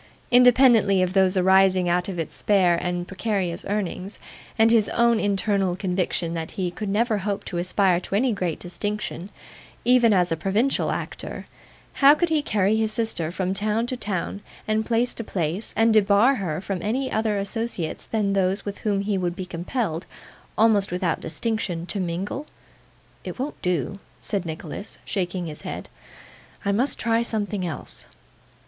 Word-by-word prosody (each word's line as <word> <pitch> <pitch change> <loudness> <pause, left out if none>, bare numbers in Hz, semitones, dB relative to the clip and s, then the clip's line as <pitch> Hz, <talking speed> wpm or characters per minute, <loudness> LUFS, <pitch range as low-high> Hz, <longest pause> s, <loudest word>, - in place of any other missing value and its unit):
Independently 240 -6 +6
of 180 0 -1
those 190 -1 +3
arising 190 0 +4
out 180 +2 +1
of 185 - -5
its 165 - -3
spare 185 -4 +3
and 175 +1 -2
precarious 190 -3 -2
earnings, 200 -1 -3 0.4
and 225 +1 +5
his 220 -3 +4
own 235 -1 +3
internal 200 -2 +1
conviction 180 -2 -1
that 165 -1 -4
he 185 -4 -2
could 205 +3 -5
never 215 +1 +1
hope 200 +1 -3
to 175 - -3
aspire 185 0 +2
to 190 - -4
any 240 +3 +2
great 180 -5 -2
distinction, 195 0 -4 0.6
even 240 -2 +5
as 180 -3 +2
a - - +2
provincial 205 +11 0
actor, - - -5 0.6
how 280 +2 +8
could 345 +2 0
he 315 -2 +2
carry 205 -5 +1
his 220 -1 +1
sister 215 -8 -2
from 185 +1 -2
town 215 +3 +1
to 255 - -2
town, 200 -3 -3 0.3
and 215 0 0
place 240 +1 +1
to 230 - -5
place, 180 0 -2
and 225 0 +4
debar 210 +4 +5
her 180 - -3
from 190 -1 -4
any 255 +7 -1
other 215 -1 0
associates 200 -4 -3
than 210 -3 0
those 195 +1 +1
with 205 -1 -5
whom 205 -2 0
he 200 -1 -1
would 175 -1 -2
be 185 - -5
compelled, 180 0 -3 0.5
almost 210 -3 +4
without 180 -2 -1
distinction, 185 -3 -3
to 200 - -3
mingle? 190 - -3 0.8
'It - - -6
won't 270 +4 -5
do,' 180 +1 -1 0.2
said 195 -5 -3
Nicholas, 160 +5 -5
shaking 180 -2 -2
his 155 -2 -7
head; - - -6 0.8
'I 200 - +2
must 245 +8 +1
try 230 0 +1
something 210 -4 -1
else. 170 -4 -5
200 Hz, 165 wpm, -24 LUFS, 180-220 Hz, 0.8 s, how